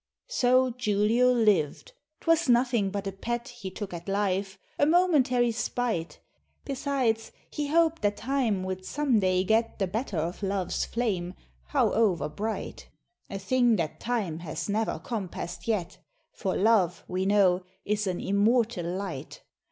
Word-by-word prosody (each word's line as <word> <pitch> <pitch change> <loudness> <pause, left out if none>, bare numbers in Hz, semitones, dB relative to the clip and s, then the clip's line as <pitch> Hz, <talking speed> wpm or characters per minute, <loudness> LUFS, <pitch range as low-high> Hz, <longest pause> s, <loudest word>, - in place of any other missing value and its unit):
So 255 - +3
Julio 230 +1 +2
liv'd: 210 - +2 0.3
'twas 330 -3 +2
nothing 240 -4 +3
but 200 0 -4
a 195 - -2
pet 235 +5 -4
He 240 -6 -7
took 190 0 -7
at 170 +2 -7
life 195 -1 -1 0.2
a 285 - +4
momentary 285 -9 +3
spite; 220 -5 -2 0.5
Besides, 265 -5 -1 0.2
he 295 -1 -2
hoped 330 +1 +2
that 205 0 +1
time 235 -6 0
would 185 0 -4
some 275 +1 +1
day 185 -1 +2
get 225 +3 +1
The 195 - +1
better 210 +1 -3
of 170 +5 -2
love's 195 -2 -1
flame, 190 -7 -2 0.4
howover 185 - +2
bright; 220 +2 -4 0.4
A 195 - -4
thing 240 +4 +2
that 165 -6 -3
time 210 -10 -2
has 155 -2 -5
never 215 +2 0
compass'd 190 -5 -5
yet, 210 -7 -1 0.3
For 190 - -3
love, 195 -4 +3
we 185 +1 -1
know, 190 -3 +4 0.2
is 210 0 0
an 180 -1 -1
immortal 210 -2 +1
light. 180 -5 -5
210 Hz, 145 wpm, -28 LUFS, 185-245 Hz, 0.5 s, a